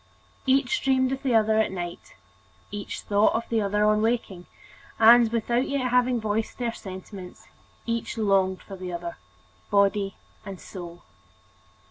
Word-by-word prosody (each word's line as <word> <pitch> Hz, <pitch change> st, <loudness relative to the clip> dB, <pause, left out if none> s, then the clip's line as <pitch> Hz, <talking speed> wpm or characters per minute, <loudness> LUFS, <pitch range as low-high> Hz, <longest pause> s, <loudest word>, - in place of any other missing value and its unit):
Each 275 Hz, +10 st, +2 dB
dreamed 260 Hz, -1 st, +2 dB
of 270 Hz, 0 st, -3 dB
the 260 Hz, -4 st, +1 dB
other 220 Hz, 0 st, +4 dB
at 220 Hz, -, +1 dB
night, 175 Hz, -2 st, -7 dB, 0.6 s
each 205 Hz, -1 st, -5 dB
thought 205 Hz, +2 st, +2 dB
of 230 Hz, -, -2 dB
the 225 Hz, -1 st, +1 dB
other 210 Hz, +1 st, +1 dB
on 210 Hz, 0 st, +3 dB
awaking, 215 Hz, -5 st, -1 dB, 0.3 s
* -, -, -23 dB
and, 230 Hz, 0 st, +7 dB
without 235 Hz, +2 st, 0 dB
yet 265 Hz, -3 st, -1 dB
having 250 Hz, -1 st, +3 dB
voiced 215 Hz, 0 st, -2 dB
their 240 Hz, -2 st, -2 dB
sentiments, 190 Hz, -2 st, -10 dB, 0.4 s
each 230 Hz, 0 st, -3 dB
longing 195 Hz, -3 st, +2 dB
for 195 Hz, -, -10 dB
the 185 Hz, -1 st, -6 dB
other, 170 Hz, 0 st, -5 dB, 0.5 s
body 200 Hz, -1 st, +2 dB, 0.3 s
and 195 Hz, -3 st, -8 dB
soul. 175 Hz, -2 st, -10 dB
215 Hz, 150 wpm, -26 LUFS, 195-235 Hz, 0.6 s, and